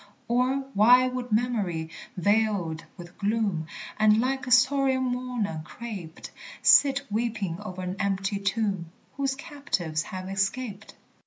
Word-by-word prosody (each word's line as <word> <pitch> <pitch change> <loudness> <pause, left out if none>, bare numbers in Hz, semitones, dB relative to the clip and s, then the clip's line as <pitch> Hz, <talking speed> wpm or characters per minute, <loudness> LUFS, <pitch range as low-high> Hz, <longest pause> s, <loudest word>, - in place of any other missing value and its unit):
Or 255 +3 +2
why 245 +5 +6
should 250 -1 -4
Memory, 210 -8 0 0.3
veiled 200 -4 +1
with 175 0 -11
gloom, 205 -6 0 0.3
And 215 0 +5
like 260 +1 -1
a - - -4
sorrowing 265 +1 +4
mourner 245 -9 -2
craped, 190 -5 -8 0.3
Sit 280 0 +6
weeping 210 -6 -2
o'er 185 -3 -6
an 180 +1 -4
empty 195 0 -1
tomb, 200 -4 -1 0.3
Whose 275 -1 0
captives 275 - -3
have 185 +3 -6
escaped? 200 +2 -3
215 Hz, 125 wpm, -27 LUFS, 185-250 Hz, 0.3 s, why